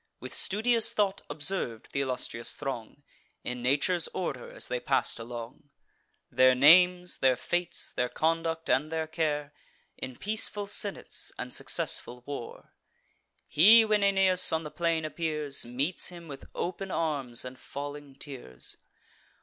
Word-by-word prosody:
With -, -, -8 dB
studious 225 Hz, +3 st, +3 dB
thought 200 Hz, -2 st, +1 dB
observ'd 145 Hz, -, -1 dB
th' -, -, -5 dB
illustrious 125 Hz, -3 st, -2 dB
throng, 135 Hz, -1 st, -6 dB, 0.4 s
In 125 Hz, 0 st, -4 dB
nature's 145 Hz, +7 st, +1 dB
order 140 Hz, -9 st, -3 dB
as -, -, -4 dB
they 125 Hz, -, -2 dB
pass'd 135 Hz, -2 st, 0 dB
along: 120 Hz, +4 st, -8 dB, 0.6 s
Their 130 Hz, +1 st, +5 dB
names, 180 Hz, +6 st, +5 dB
their 130 Hz, -1 st, +4 dB
fates, 175 Hz, +7 st, -2 dB
their 125 Hz, 0 st, -1 dB
conduct, 165 Hz, 0 st, -1 dB
and 150 Hz, +4 st, +1 dB
their 160 Hz, -1 st, -1 dB
care, 150 Hz, -2 st, -2 dB, 0.5 s
In 130 Hz, -, -6 dB
peaceful 205 Hz, -, -1 dB
senates 205 Hz, 0 st, -1 dB
and -, -, -6 dB
successful 125 Hz, 0 st, -1 dB
war. 140 Hz, -4 st, -8 dB, 0.7 s
He, 220 Hz, +8 st, +7 dB
when 215 Hz, -1 st, +2 dB
Aeneas 190 Hz, -2 st, +4 dB
on 160 Hz, 0 st, 0 dB
the 150 Hz, -, -7 dB
plain 165 Hz, -2 st, 0 dB
appears, 150 Hz, -5 st, -2 dB
Meets 140 Hz, +9 st, -1 dB
him 170 Hz, -2 st, -8 dB
with 140 Hz, -3 st, -9 dB
open 190 Hz, +2 st, -3 dB
arms, 140 Hz, -9 st, -1 dB
and 130 Hz, 0 st, -9 dB
falling 145 Hz, 0 st, -7 dB
tears. 125 Hz, -, -5 dB
150 Hz, 135 wpm, -29 LUFS, 130-180 Hz, 0.7 s, He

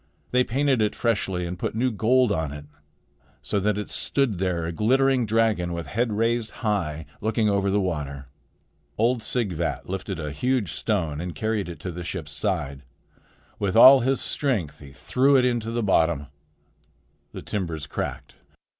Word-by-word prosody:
They 125 Hz, 0 st, +4 dB
painted 135 Hz, 0 st, +1 dB
it 105 Hz, -, +1 dB
freshly 95 Hz, -6 st, -1 dB
and 90 Hz, +1 st, -5 dB
put -, -, -3 dB
new 125 Hz, +3 st, +1 dB
gold 115 Hz, +3 st, +3 dB
on 80 Hz, -5 st, -1 dB
it, 75 Hz, 0 st, -8 dB, 0.8 s
so 100 Hz, -, -1 dB
that 105 Hz, +1 st, 0 dB
it 105 Hz, -, -5 dB
stood 125 Hz, -10 st, +1 dB
there 90 Hz, -3 st, -1 dB
a 85 Hz, -, -3 dB
glittering 130 Hz, +5 st, +2 dB
dragon 110 Hz, -6 st, +1 dB
with 85 Hz, -1 st, -4 dB
head 115 Hz, -, -1 dB
raised 115 Hz, +1 st, 0 dB, 0.2 s
high, 80 Hz, -8 st, -1 dB, 0.2 s
looking 110 Hz, 0 st, +1 dB
over 100 Hz, 0 st, +1 dB
the 100 Hz, +1 st, +2 dB
water. 75 Hz, -7 st, -3 dB, 0.7 s
Old 115 Hz, +2 st, +2 dB
Sighvat 95 Hz, -8 st, -2 dB
lifted 95 Hz, 0 st, -4 dB
a 75 Hz, -2 st, -4 dB
huge 120 Hz, -, 0 dB
stone 80 Hz, -3 st, -1 dB
and 90 Hz, 0 st, -5 dB
carried 110 Hz, -4 st, -2 dB
it 85 Hz, -, -8 dB
to 90 Hz, -, -4 dB
the 85 Hz, +1 st, -6 dB
ship's 85 Hz, -3 st, -5 dB
side. 75 Hz, -3 st, -1 dB, 0.8 s
With 100 Hz, -1 st, -1 dB
all 130 Hz, +4 st, +10 dB
his 130 Hz, +2 st, +1 dB
strength 110 Hz, -, -2 dB
he 70 Hz, -2 st, -12 dB
threw 130 Hz, -, +2 dB
it 130 Hz, -2 st, +5 dB
into 120 Hz, -3 st, 0 dB
the 115 Hz, 0 st, -1 dB
bottom. 80 Hz, -7 st, +2 dB, 1.1 s
The -, -, -8 dB
timbers 85 Hz, -7 st, -3 dB
cracked. -, -, -5 dB
100 Hz, 165 wpm, -25 LUFS, 85-115 Hz, 1.1 s, all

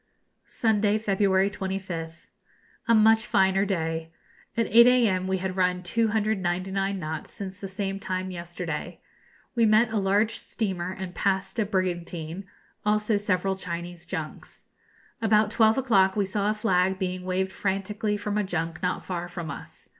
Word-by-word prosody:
Sunday, 210 Hz, -2 st, +2 dB
February 195 Hz, -2 st, +2 dB
25th. 185 Hz, -4 st, -5 dB, 0.6 s
A 230 Hz, -, +5 dB
much 220 Hz, 0 st, +5 dB
finer 190 Hz, +1 st, +3 dB
day. 165 Hz, -4 st, -2 dB, 0.5 s
At 230 Hz, -, +3 dB
8 235 Hz, +3 st, +7 dB
a.m. 220 Hz, -7 st, +3 dB
we 190 Hz, 0 st, +1 dB
had 185 Hz, 0 st, -3 dB
run 180 Hz, -1 st, +1 dB
299 195 Hz, -2 st, 0 dB
knots 160 Hz, -3 st, -5 dB
since 195 Hz, -1 st, -7 dB
the 195 Hz, -, -4 dB
same 195 Hz, 0 st, -3 dB
time 185 Hz, -1 st, -3 dB
yesterday. 170 Hz, -2 st, -5 dB, 0.5 s
We 230 Hz, -2 st, +3 dB
met 220 Hz, +2 st, +4 dB
a -, -, +1 dB
large 200 Hz, +3 st, +2 dB
steamer 185 Hz, -6 st, -3 dB
and 190 Hz, -1 st, -6 dB
passed 190 Hz, +3 st, 0 dB
a 215 Hz, -, +2 dB
brigantine; 175 Hz, -2 st, -3 dB, 0.4 s
also 210 Hz, 0 st, +2 dB
several 195 Hz, -1 st, 0 dB
Chinese 175 Hz, -1 st, -6 dB
junks. -, -, -6 dB, 0.6 s
About 215 Hz, -1 st, +3 dB
twelve 220 Hz, +1 st, +4 dB
o'clock 195 Hz, -8 st, +3 dB
we 205 Hz, -2 st, +1 dB
saw 200 Hz, +2 st, -1 dB
a 215 Hz, -, +1 dB
flag 190 Hz, -3 st, +2 dB
being 185 Hz, -1 st, -3 dB
waved 185 Hz, +1 st, -1 dB
frantically 205 Hz, +2 st, -1 dB
from 205 Hz, 0 st, -2 dB
a -, -, +1 dB
junk 165 Hz, -3 st, -3 dB
not 180 Hz, 0 st, -1 dB
far 175 Hz, -1 st, -3 dB
from 175 Hz, -2 st, -6 dB
us. -, -, -9 dB
190 Hz, 150 wpm, -26 LUFS, 180-210 Hz, 0.6 s, 8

